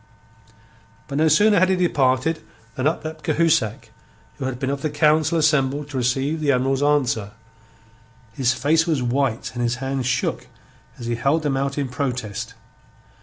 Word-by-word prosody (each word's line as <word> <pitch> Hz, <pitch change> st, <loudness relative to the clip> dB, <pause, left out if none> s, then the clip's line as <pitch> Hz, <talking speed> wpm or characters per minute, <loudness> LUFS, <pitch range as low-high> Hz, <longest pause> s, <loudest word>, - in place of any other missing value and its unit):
But 140 Hz, -, -3 dB
no 160 Hz, -, +4 dB
sooner 205 Hz, +6 st, +5 dB
had 185 Hz, +1 st, +3 dB
he 190 Hz, -, +3 dB
departed 155 Hz, -3 st, +1 dB, 0.3 s
than 130 Hz, +2 st, 0 dB
up 160 Hz, 0 st, -2 dB
leapt 155 Hz, -1 st, -7 dB
Cahusac, 150 Hz, -10 st, +1 dB, 0.5 s
who -, -, -3 dB
had 130 Hz, -2 st, -3 dB
been 130 Hz, +1 st, -2 dB
of 140 Hz, -1 st, -3 dB
the 155 Hz, -, -1 dB
council 155 Hz, +2 st, +2 dB
assembled 145 Hz, -2 st, +1 dB
to 135 Hz, -, -4 dB
receive 135 Hz, +5 st, 0 dB
the 150 Hz, -2 st, +2 dB
Admiral's 135 Hz, +1 st, +1 dB
answer. 125 Hz, -8 st, +1 dB, 1.0 s
His 130 Hz, -1 st, +1 dB
face 155 Hz, +6 st, +1 dB
was 150 Hz, -6 st, 0 dB
white 125 Hz, -1 st, -1 dB
and 120 Hz, -, -4 dB
his 120 Hz, 0 st, 0 dB
hands 135 Hz, 0 st, -3 dB
shook 120 Hz, -2 st, -1 dB, 0.5 s
as 120 Hz, -, -8 dB
he 120 Hz, -, -1 dB
held 140 Hz, +7 st, +1 dB
them 145 Hz, -2 st, 0 dB
out 140 Hz, +1 st, -2 dB
in 140 Hz, -2 st, -1 dB
protest. 125 Hz, -4 st, -4 dB
140 Hz, 170 wpm, -22 LUFS, 125-155 Hz, 1.0 s, sooner